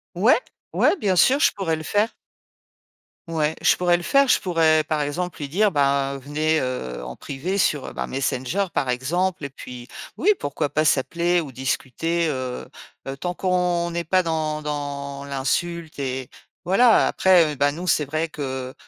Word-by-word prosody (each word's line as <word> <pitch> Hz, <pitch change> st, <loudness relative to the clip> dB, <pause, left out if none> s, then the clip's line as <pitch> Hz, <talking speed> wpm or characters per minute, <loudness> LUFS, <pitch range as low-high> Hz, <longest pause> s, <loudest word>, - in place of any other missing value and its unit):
Ouais, -, -, +5 dB, 0.4 s
ouais, -, -, +3 dB
bien 195 Hz, -, +1 dB
sûr, 265 Hz, +10 st, +5 dB
je -, -, +4 dB
pourrais 185 Hz, -6 st, -1 dB
le 155 Hz, -, -7 dB
faire. 205 Hz, +8 st, +1 dB, 1.2 s
Ouais, 160 Hz, -2 st, 0 dB
je -, -, +5 dB
pourrais 175 Hz, -1 st, +2 dB
le 175 Hz, -, -8 dB
faire. 275 Hz, +8 st, +4 dB
Je -, -, +4 dB
pourrais, 160 Hz, -3 st, +3 dB
par 155 Hz, 0 st, -1 dB
exemple, 170 Hz, +5 st, -3 dB
lui 145 Hz, -, -4 dB
dire: 200 Hz, +8 st, +2 dB
«Ben, 140 Hz, -2 st, +1 dB
venez, 155 Hz, +3 st, 0 dB
heu, 65 Hz, -, -4 dB
en 60 Hz, 0 st, -7 dB
privé 175 Hz, +9 st, -4 dB
sur, 150 Hz, -4 st, +1 dB
heu, -, -, -7 dB
ben, -, -, -3 dB
Messenger, 135 Hz, +8 st, -1 dB
par 135 Hz, -, 0 dB
exemple.» 160 Hz, +7 st, -1 dB
Et -, -, -4 dB
puis 125 Hz, -2 st, -10 dB, 0.3 s
oui, 415 Hz, +5 st, +4 dB
pourquoi 145 Hz, +1 st, -2 dB
pas 155 Hz, +2 st, 0 dB
s'appeler 170 Hz, +5 st, +2 dB
ou 150 Hz, -5 st, -5 dB
discuter, 135 Hz, +6 st, -1 dB
heu 130 Hz, -3 st, -4 dB, 0.4 s
heu, 135 Hz, -, -4 dB
tant 175 Hz, +4 st, -3 dB
qu'on 180 Hz, -2 st, 0 dB
n'est 170 Hz, 0 st, -2 dB
pas 185 Hz, +3 st, +2 dB
dans 155 Hz, -2 st, -2 dB
dans 140 Hz, -1 st, -4 dB
l'insulte. 155 Hz, +4 st, -2 dB
Et 130 Hz, -1 st, -3 dB, 0.4 s
voilà, 225 Hz, +6 st, +5 dB
après, 175 Hz, -5 st, +4 dB
heu, -, -, -8 dB
bah, 145 Hz, +1 st, +2 dB
nous, 170 Hz, +5 st, -6 dB
c'est 150 Hz, -, +2 dB
vrai 155 Hz, +4 st, -2 dB
que, 130 Hz, -4 st, -5 dB
155 Hz, 180 wpm, -23 LUFS, 140-175 Hz, 1.2 s, Ouais